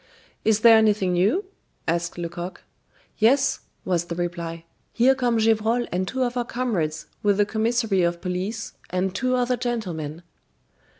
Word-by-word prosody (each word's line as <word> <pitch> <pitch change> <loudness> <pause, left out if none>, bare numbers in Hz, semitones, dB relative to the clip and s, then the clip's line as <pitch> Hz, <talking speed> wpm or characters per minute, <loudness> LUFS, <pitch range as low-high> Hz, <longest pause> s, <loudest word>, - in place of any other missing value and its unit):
"Is 220 -1 +3
there 230 -1 +8
anything 205 -4 +2
new?" 205 - +2 0.4
asked 170 +1 -1
Lecoq. 175 +1 -6 0.6
"Yes," 265 +5 +3 0.3
was 175 -2 0
the 170 - -5
reply. 170 -1 -4 0.3
"Here 250 +3 +4
come 245 -3 +1
Gevrol 225 +2 +2
and 185 +1 -1
two 260 +3 -1
of 245 0 -2
our 245 - 0
comrades 215 -12 -2 0.2
with 205 -1 +2
the 205 - +4
commissary 220 -2 +1
of 170 0 +1
police 190 +5 -3 0.2
and 185 +1 -1
two 255 +4 0
other 250 0 +1
gentlemen." 175 -10 -4
210 Hz, 145 wpm, -24 LUFS, 175-240 Hz, 0.6 s, there